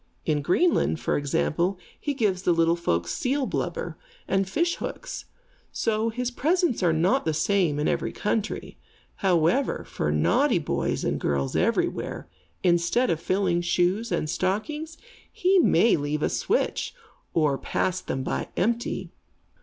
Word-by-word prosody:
In 150 -2 +1
Greenland, 180 - +2
for - - 0
example, 170 +5 0 0.2
he 290 -2 -2
gives 205 -8 +1
the 175 - +3
little 165 0 +3
folks 85 - -1
seal 270 +2 0
blubber, - - -3 0.3
and 195 -1 +1
fish 340 - 0
hooks. - - -6 0.5
So 225 0 0
his 250 +2 -2
presents 325 - +1
are 175 -2 +3
not 175 +12 +2
the 160 -1 0
same 170 -2 +2
in 150 - 0
every - - 0
country. 210 0 -3 0.4
However, 185 - +2
for 75 - -2
naughty 75 0 +3
boys - - -1
and - - 0
girls 70 -2 -1
everywhere, - - 0 0.4
instead 175 +8 +2
of 160 - 0
filling 185 0 +1
shoes 180 +6 +1
and - - 0
stockings, 295 - -2 0.3
he 375 +1 +3
may 235 -8 +5
leave 150 0 -2
a - - +2
switch, - - -1 0.4
or 150 -4 +2
pass 185 0 -1
them 130 - -3
by - - -2
empty. 235 +5 -1
185 Hz, 145 wpm, -26 LUFS, 160-240 Hz, 0.5 s, may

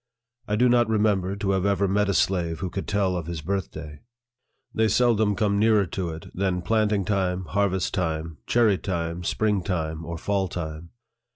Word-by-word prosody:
I 105 - 0
do 125 +4 +4
not 120 -1 +3
remember 105 -3 +1
to 100 -1 -1
have 95 -1 +1
ever 100 0 +2
met 100 +1 +1
a 100 - +1
slave 85 -2 +1
who 95 -2 -3
could 95 - -4
tell 100 -3 +1
of 85 -3 -4
his 85 -2 -4
birthday. 80 -4 -4 0.7
They 110 0 +2
seldom 110 -2 +3
come 100 0 +1
nearer 105 -2 +4
to 90 0 -3
it 80 0 -7
than 90 -2 -1
planting 105 -2 +1
time, 95 -2 0
harvest 95 -1 0
time, 80 -4 -2
cherry 110 -5 +3
time, 85 -2 -3
spring 105 +2 +1
time, 80 -3 -3
or 85 +1 -5
fall 100 +2 0
time. 80 -1 -6
95 Hz, 180 wpm, -25 LUFS, 85-105 Hz, 0.7 s, do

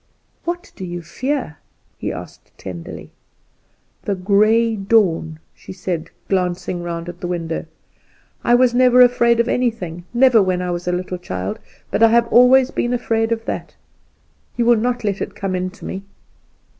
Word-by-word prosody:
"What 350 +3 -4
do 190 - -8
you 175 -1 -5
fear?" 250 - -3 0.4
he - - -4
asked, - - -10
tenderly. 85 -3 -8 0.9
"The 200 - -2
Grey 215 +4 +3
Dawn," 195 -6 +1 0.2
she - - -12
said, 180 -3 -4 0.2
glancing 180 -1 -1
round 170 0 -5
at 175 0 -8
the 175 - -4
window. 165 -2 -3 0.8
"I 240 - +4
was 245 -1 +4
never 250 0 +5
afraid 235 -1 +4
of 235 - +2
anything, 190 -10 -2
never, 245 -2 +5
when 185 -2 +1
I 180 0 -2
was 175 0 -4
a - - +2
little 180 0 -3
child, 95 - -4 0.3
but - - 0
I 225 - +8
have 235 +1 +4
always 255 +2 +6
been 240 - -1
afraid 225 -2 0
of 225 0 -1
that. - - -5 0.8
You 240 - +1
will 240 0 +6
not 245 +1 -1
let 200 -2 -1
it - - -4
come 195 -2 -3
in 185 0 -2
to 205 - -13
me?" 190 - -5
200 Hz, 170 wpm, -20 LUFS, 175-240 Hz, 0.9 s, I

